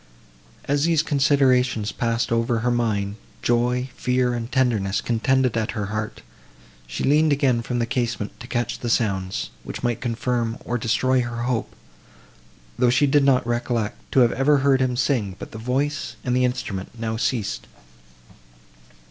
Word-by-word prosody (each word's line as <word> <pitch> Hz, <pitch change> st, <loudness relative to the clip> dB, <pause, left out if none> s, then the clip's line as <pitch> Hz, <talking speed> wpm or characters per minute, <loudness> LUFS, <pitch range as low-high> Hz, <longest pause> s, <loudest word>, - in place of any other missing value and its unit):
As 145 Hz, +2 st, +1 dB
these 165 Hz, -2 st, +3 dB
considerations 130 Hz, -7 st, +2 dB
passed 115 Hz, -1 st, -1 dB
over 115 Hz, 0 st, +1 dB
her 125 Hz, +1 st, +1 dB
mind, 105 Hz, -4 st, 0 dB, 0.3 s
joy, 125 Hz, +2 st, +1 dB
fear 125 Hz, -1 st, +1 dB
and 120 Hz, +1 st, -4 dB
tenderness 115 Hz, -7 st, +1 dB
contended 125 Hz, +1 st, +1 dB
at 110 Hz, -2 st, -1 dB
her 105 Hz, -, -1 dB
heart; 105 Hz, 0 st, -4 dB, 0.6 s
she -, -, -4 dB
leaned 150 Hz, +2 st, +4 dB
again 135 Hz, -4 st, +2 dB
from 120 Hz, +1 st, -3 dB
the 120 Hz, -, +1 dB
casement 120 Hz, -3 st, -3 dB
to 120 Hz, -, -9 dB
catch 120 Hz, -1 st, -2 dB
the 120 Hz, -, -3 dB
sounds, 95 Hz, -5 st, 0 dB
which -, -, -7 dB
might 120 Hz, -3 st, -1 dB
confirm, 120 Hz, -1 st, -1 dB
or 120 Hz, 0 st, -1 dB
destroy 125 Hz, +3 st, +2 dB
her 120 Hz, -1 st, -4 dB
hope, 120 Hz, -3 st, -2 dB, 1.0 s
though 125 Hz, -1 st, +4 dB
she 125 Hz, +4 st, +4 dB
did 145 Hz, 0 st, +3 dB
not 135 Hz, -3 st, +3 dB
recollect 120 Hz, -2 st, -1 dB, 0.2 s
to 135 Hz, -, +5 dB
have 120 Hz, -, +5 dB
ever 145 Hz, +3 st, +3 dB
heard 135 Hz, -1 st, +4 dB
him 125 Hz, -1 st, 0 dB
sing; 120 Hz, -8 st, 0 dB
but -, -, -9 dB
the 110 Hz, -, -8 dB
voice, 135 Hz, +6 st, -1 dB
and 125 Hz, -1 st, 0 dB
the 125 Hz, 0 st, +3 dB
instrument, 115 Hz, -6 st, -3 dB
now 110 Hz, -1 st, -2 dB
ceased. 115 Hz, -2 st, -2 dB
120 Hz, 160 wpm, -23 LUFS, 115-130 Hz, 1.0 s, to